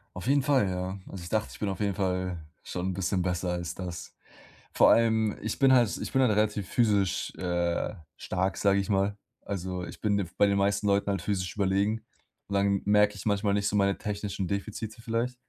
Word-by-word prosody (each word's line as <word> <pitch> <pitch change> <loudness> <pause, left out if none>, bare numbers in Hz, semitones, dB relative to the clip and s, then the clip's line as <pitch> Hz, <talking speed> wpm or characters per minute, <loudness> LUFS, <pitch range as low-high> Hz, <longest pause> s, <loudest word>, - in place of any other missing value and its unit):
Auf - - -6
jeden 140 0 +3
Fall, 135 -9 +3
ja. 90 +1 -3
Also, 95 -3 -8
ich 85 - -8
dachte, 110 -1 0
ich - - -12
bin 105 - -1
auf 95 - -4
jeden 100 -2 0
Fall 90 -2 -1 0.3
schon 90 +1 -4
'n 95 - -2
bisschen 95 0 -1
besser 90 0 -1
als 85 -1 -3
das. 90 -3 -7 0.6
Vor - - +6
allem, 110 -2 +3
ich 110 +1 -3
bin 135 -1 +5
halt 120 -5 +4
ich - - -5
bin 135 - +3
halt 125 -4 +4
relativ 105 -2 0
physisch, 100 -6 +1
äh, 85 +1 -1 0.2
stark, 95 +1 -2
sage 100 -1 +3
ich 100 - -3
mal. 100 0 +1 0.2
Also, 90 -2 -4
ich - - -10
bin 105 -2 +2
den 100 -3 -1
bei 100 - +5
den 100 0 +2
meisten 100 +1 +1
Leuten 100 0 +2
halt 100 - -2
physisch 95 -3 -2
überlegen. 100 +2 +1 0.5
Und 100 - -3
dann 100 0 +2
merke 105 0 +4
ich 100 - -9
manchmal 100 0 +1
nicht 100 0 +1
so - - -1
meine 100 -1 +2
technischen 100 -2 -3
Defizite 110 +3 -4
vielleicht. 115 +2 -1
100 Hz, 215 wpm, -28 LUFS, 95-105 Hz, 0.6 s, Vor